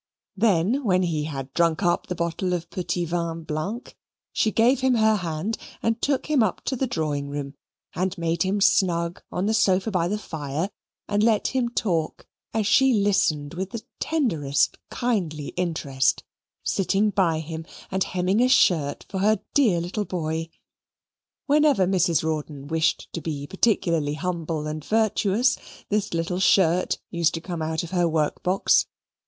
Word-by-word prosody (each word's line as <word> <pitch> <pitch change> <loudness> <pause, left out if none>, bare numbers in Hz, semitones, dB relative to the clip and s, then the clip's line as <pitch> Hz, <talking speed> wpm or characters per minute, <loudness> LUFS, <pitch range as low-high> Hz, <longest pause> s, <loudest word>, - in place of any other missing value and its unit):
Then 210 - +2
when 185 -4 +2
he 155 -4 -1
had 135 -3 -6
drunk 170 +2 +2
up 175 +1 +1
the 180 - -3
bottle 170 +2 -1
of 170 -1 -4
petit 175 -1 -2
vin 165 -1 -3
blanc, 160 +11 -4 0.4
she 220 - +2
gave 245 +4 +3
him 260 -1 +2
her 220 -1 +4
hand, 180 +4 -3 0.2
and 225 0 0
took 275 -2 0
him 300 -4 +2
up 215 -5 0
to 265 - -1
the 260 +1 -1
drawing 150 - -2
room, 140 -1 -5 0.4
and 185 +1 -2
made 165 -1 -1
him 195 +3 +1
snug 170 -3 +2
on 180 - -1
the 220 - +1
sofa 195 0 +2
by 175 -3 +1
the 205 +4 -1
fire, 160 -1 -4 0.4
and 205 0 +1
let 220 -1 +3
him 255 -2 0
talk 175 -9 -1 0.3
as 220 -2 0
she 265 +4 +4
listened 175 -8 +1
with 185 +2 -4
the 225 +1 -6 0.2
tenderest 165 - 0
kindly 175 - -2
interest, 160 -7 0 0.4
sitting 200 +2 +1
by 170 -6 +2
him, 160 0 -6 0.3
and 190 0 +1
hemming 185 +4 +1
a 250 - +5
shirt 155 - +3
for 190 - -4
her 210 +1 +3
dear 225 -12 +4
little 180 +5 -3
boy. 165 -2 -3 1.0
Whenever 290 -8 +4
Mrs. 180 -4 +2
Rawdon 150 -3 -3
wished 160 0 +1
to 170 - -4
be 145 -2 -4
particularly 170 -5 +1
humble 165 -2 -3
and 155 0 -4
virtuous, 220 - +2 0.3
this 210 0 0
little 165 +2 -1
shirt 185 -2 +3
used 170 -2 +1
to - - -3
come 170 -1 -5
out 160 +1 -1
of 170 - -8
her 175 -2 +2
work 155 -2 0
box. 185 +2 +3
180 Hz, 165 wpm, -24 LUFS, 160-210 Hz, 1.0 s, a